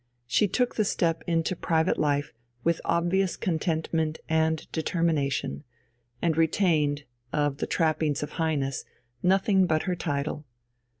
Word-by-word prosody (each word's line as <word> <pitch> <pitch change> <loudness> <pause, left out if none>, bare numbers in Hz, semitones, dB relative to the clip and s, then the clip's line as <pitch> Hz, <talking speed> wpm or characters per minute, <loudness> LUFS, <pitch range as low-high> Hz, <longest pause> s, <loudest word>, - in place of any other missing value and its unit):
She 125 - +3
took 245 +6 0
the 215 - +4
step 165 -4 0
into 165 +1 +1
private 165 0 +1
life 145 -1 0 0.3
with 170 0 +1
obvious 175 +2 +1
contentment 160 -2 -1
and 160 0 +1
determination, 155 - 0 0.6
and 165 -2 +2
retained, 155 -3 +2 0.3
of 145 -2 0
the - - -2
trappings 155 -3 +1
of 150 - -5
Highness, 140 -5 0 0.4
nothing 190 0 +3
but 155 -1 +1
her 180 -2 -1
title. 145 -2 -2
160 Hz, 125 wpm, -27 LUFS, 150-175 Hz, 0.6 s, the